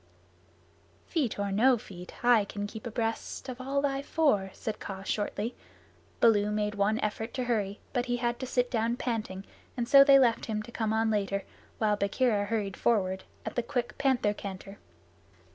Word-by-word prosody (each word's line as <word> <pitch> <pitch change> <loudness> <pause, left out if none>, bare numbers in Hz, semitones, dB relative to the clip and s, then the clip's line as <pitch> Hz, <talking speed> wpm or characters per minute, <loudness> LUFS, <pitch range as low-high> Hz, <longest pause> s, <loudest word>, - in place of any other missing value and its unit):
"Feet 290 - -1
or 200 0 -1
no 245 +6 +4
feet, 180 +1 -10
I 240 -3 +6
can 205 0 -5
keep 220 +3 -7
abreast 225 +2 -3
of 255 0 -6
all 275 +2 0
thy 275 -1 0
four," 280 -10 +1
said 220 - -5
Kaa 195 -1 -6
shortly. 210 +3 -2 0.7
Baloo 210 -3 +4
made 210 0 -1
one 210 +2 +1
effort 220 +2 -3
to 255 - -1
hurry, 210 -5 -1
but 245 -1 0
had 240 0 -1
to 260 - -4
sit 245 -1 0
down 230 0 +1
panting, 215 -6 -3 0.3
and 235 -1 -1
so 275 +1 +9
they 275 -1 +7
left 240 -4 +3
him 215 -1 -2
to 235 - -11
come 220 -2 -1
on 220 0 +2
later, 200 -2 0 0.3
while 215 -2 +2
Bagheera 205 +1 +1
hurried 205 -3 -2
forward, 190 -5 +1 0.2
at - - -4
the 240 - +2
quick 245 0 -3
panther 260 -6 +2
canter. 195 0 -8
225 Hz, 175 wpm, -29 LUFS, 205-245 Hz, 0.7 s, so